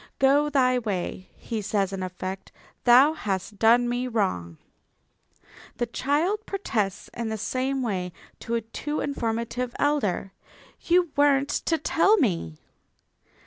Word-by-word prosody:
"Go 285 +2 +4
thy 255 -3 +3
way," 190 -4 -4
he 225 -2 -4
says 195 -1 -1
in 190 - -4
effect, 185 +1 -6 0.3
"thou 260 +5 +7
hast 200 -7 -4
done 235 +2 +5
me 245 +1 -1
wrong." 140 - -1 1.2
The 240 - 0
child 310 - 0
protests 215 - -2
in 235 -1 -3
the 220 - -3
same 260 +5 -1
way 185 -6 -2 0.3
to 235 - -3
a 230 - 0
too 295 +7 -4
informative 235 -2 -2
elder: 215 -10 0 0.5
"You 345 -2 +2
weren't 285 -1 +3
to 325 - 0
tell 400 +7 +3
me!" 170 - 0
240 Hz, 130 wpm, -25 LUFS, 200-285 Hz, 1.2 s, thou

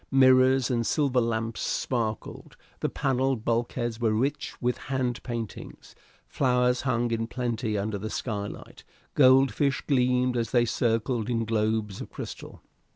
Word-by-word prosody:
Mirrors 130 -1 +5
and 120 -1 +1
silver 130 0 +1
lamps 115 -1 -2
sparkled; 115 -4 -3 0.2
the - - -1
panelled 135 -4 0
bulkheads 120 0 -1
were 110 -2 +2
rich 140 +6 -2
with 125 -1 -1
hand 130 -2 -1
paintings; 115 -3 -7 0.3
flowers 125 -1 +1
hung 120 -3 0
in 115 0 -1
plenty 120 -3 -2
under 100 0 -2
the 110 +2 -4
skylight; 105 -3 -5 0.3
goldfish 135 +1 +4
gleamed 125 -2 +2
as 115 -2 -1
they 120 0 +3
circled 115 0 0
in 115 -2 0
globes 110 -2 -1
of - - -7
crystal. - - -9
120 Hz, 135 wpm, -27 LUFS, 115-130 Hz, 0.3 s, Mirrors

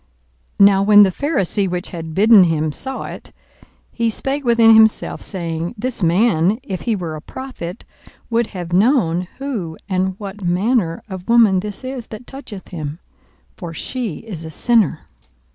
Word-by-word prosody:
42:007:039 200 - +7
Now 195 -1 +3
when 205 +1 +7
the 190 - +3
Pharisee 200 - 0
which 180 0 -4
had 165 -3 -7
bidden 210 -1 +7
him 155 -2 0
saw 265 - -5
it, - - -9 0.6
he 230 -1 0
spake 270 +6 -2
within 230 -2 +5
himself, 220 0 +4
saying, 170 -3 -4
This 245 +1 -1
man, 185 +1 +2
if 190 -9 -5
he 230 -3 0
were 170 -5 -5
a 155 - -8
prophet, 225 - -8 0.5
would 230 0 +1
have 175 -3 -7
known 185 - +2
who 220 - -4
and 190 -1 -1
what 205 0 -8
manner 180 0 0
of 190 -1 -8
woman 225 -5 +5
this 205 +4 -6
is 255 -3 -6
that 220 +3 -10
toucheth 245 -8 -9
him: 155 -3 -6 0.6
for 170 -4 -8
she 235 -6 -3
is 180 -8 -7
a 160 - -7
sinner. 215 +1 +1
200 Hz, 160 wpm, -19 LUFS, 175-230 Hz, 0.6 s, 42:007:039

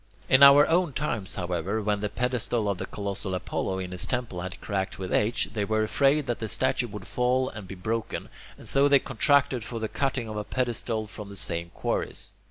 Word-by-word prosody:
In 130 - +5
our 140 +1 +9
own 170 -2 +2
times, 115 -9 -2
however, 90 +3 -2
when 105 -1 0
the 105 0 -2
pedestal 120 -2 -1
of 100 -2 -1
the - - -4
colossal 100 -2 -3
Apollo 95 +1 -2
in 95 -1 -5
his 90 +3 -2
temple 120 -8 -2
had 95 +1 -6
cracked 95 -2 -3
with 95 -1 -4
age, 110 +3 +1
they 105 -2 -1
were 110 +1 +1
afraid 140 +6 +2
that 120 - -2
the 110 - -4
statue 130 0 0
would 105 -3 -8
fall 125 +1 +1
and 105 -3 -9
be 95 - -7
broken, 110 +4 -3 0.3
and - - -9
so 140 +1 +4
they 140 -1 +7
contracted 135 -1 +2
for 115 - -6
the 110 - -2
cutting 135 -1 -2
of 110 -1 -5
a 105 - -2
pedestal 115 -2 -1
from 105 -1 -9
the 100 - -8
same 85 -1 0
quarries. - - -3
110 Hz, 210 wpm, -27 LUFS, 100-130 Hz, 0.3 s, our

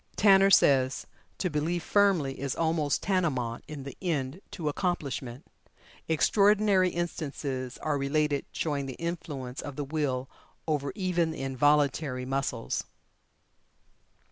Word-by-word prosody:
Tanner 195 -1 +6
says: 130 -8 +4 0.3
"To 180 - -1
believe 160 +3 -1
firmly 190 -10 +2
is 135 -1 -2
almost 160 -3 0
tantamount 145 - 0
in 150 -3 -7
the 140 - -8
end 155 -2 -2
to 165 -5 -5
accomplishment. 145 -6 -2 0.6
Extraordinary 200 +3 +4
instances 140 -7 -4
are 150 -2 0
related 145 +1 0
showing 145 -3 -2
the 130 - -6
influence 150 -7 -5
of 145 -2 -7
the 145 - -3
will 135 -3 -1 0.4
over 145 -3 0
even 180 -4 0
the 160 -4 -5
involuntary 140 0 +1
muscles." 135 - -2
150 Hz, 115 wpm, -28 LUFS, 135-175 Hz, 0.6 s, Tanner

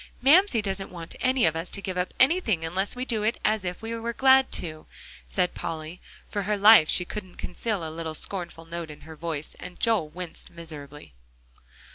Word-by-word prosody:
"Mamsie 280 - +5
doesn't 195 -1 -2
want 170 -2 -7
any 255 -3 +3
of 160 0 +2
us 165 +2 -3
to - - -3
give 190 -2 -4
up 180 0 -1
anything 255 - +3
unless 190 +7 -2
we 250 +1 -3
do 225 -4 0
it 220 +3 0
as 215 -2 +2
if 180 +3 -5
we 225 +1 -3
were 230 +1 -3
glad 265 +1 +5
to," 155 -2 -4 0.4
said 180 -2 0
Polly. 160 +2 -6 0.3
For 205 - -2
her 205 +2 0
life, 205 -5 +8
she 180 - +3
couldn't 185 -1 -7
conceal 185 -2 -3
a - - -6
little 160 -1 -4
scornful 170 -2 -4
note 165 -1 -6
in 150 - -11
her 160 0 -11
voice, 155 -2 -5
and 180 0 -9
Joel 220 -10 +2
winced 175 +1 -7
miserably. 150 - -9
180 Hz, 195 wpm, -26 LUFS, 165-220 Hz, 0.4 s, life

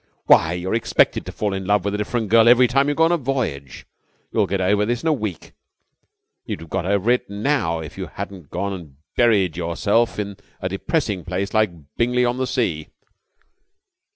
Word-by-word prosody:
Why, 80 +1 +5
you're 90 +3 -3
expected 115 - +1
to - - -4
fall 105 -2 -2
in 95 -1 -4
love 100 -1 +2
with 100 - -1
a - - -1
different 110 0 -2
girl 115 +1 +6
every 125 +1 +6
time 140 +3 +2
you 145 - 0
go 160 - +3
on 165 - +4
a 175 - +3
voyage. 120 - -3 0.5
You'll - - +1
get 100 - -1
over 100 +3 +2
this 120 +3 -1
in - - -1
a - - +4
week. 105 - -5 0.9
You'd - - -5
have 80 - -12
got 95 -2 -1
over 100 +3 +2
it 125 - 0
now 100 - 0
if 80 - -9
you - - -4
hadn't 90 -7 -8
gone 100 +3 -3
and 80 -7 -9 0.2
buried 100 -9 +3
yourself 100 +7 +1
in 100 -2 -4 0.2
a 95 - -2
depressing 100 - -1
place 95 +3 -3
like 110 -1 +3 0.3
Bingley 125 +1 +2
on 120 +1 0
the 130 0 -1
Sea." 85 - -1
105 Hz, 200 wpm, -21 LUFS, 90-120 Hz, 0.9 s, girl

